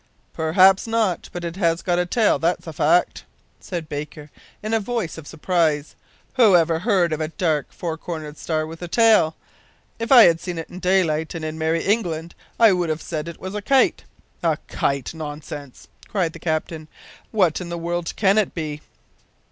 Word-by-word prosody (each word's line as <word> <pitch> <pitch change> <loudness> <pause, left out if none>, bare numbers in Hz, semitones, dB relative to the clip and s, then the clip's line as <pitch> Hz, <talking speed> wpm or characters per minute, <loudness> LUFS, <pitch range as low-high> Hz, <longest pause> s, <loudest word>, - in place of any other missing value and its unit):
"Perhaps 185 +6 +4
not, 225 -6 0
but 175 - -6
it 170 +1 -5
has 170 -3 +1
got 175 -1 +1
a 180 - 0
tail, 220 +3 +2
that's 170 +2 0
a 160 - -7
fact," 165 +4 +2 0.4
said 170 -4 -6
Baker, 150 0 -7 0.3
in 215 +1 -3
a 225 - +3
voice 220 -5 -3
of 160 -3 -10
surprise. 160 -3 0 0.4
"Who 220 -7 +6
ever 165 -1 +3
heard 180 -5 +2
of 155 - -3
a 155 - -1
dark, 160 -3 -1
four 165 -2 -5
cornered 155 -4 -6
star 155 -1 -1
with 165 +2 -10
a 175 - -5
tail? 215 -5 +4 0.6
If 230 +2 -4
I 245 -4 +10
had 165 -3 +5
seen 175 0 -5
it 165 - -7
in 180 - -8
daylight, 175 -4 +1
and 160 -1 -4
in 155 0 -5
Merry 160 +1 0
England, 170 -6 -1 0.3
I 225 -2 +7
would 175 -2 -1
have 155 0 -1
said 155 -1 -4
it 170 - -8
was 190 +1 -6
a 210 - -3
kite!" 270 +5 +2 0.4
"A - - +1
kite! 140 -1 -2
nonsense," 145 -3 -8 0.2
cried 180 -5 -1
the - - -10
captain; 155 -1 -3 0.4
"what 185 -6 +1
in 175 - -6
the 170 - -4
world 170 0 -3
can 200 0 +3
it 210 - -1
be?" 150 -3 -4
170 Hz, 190 wpm, -22 LUFS, 155-190 Hz, 0.6 s, I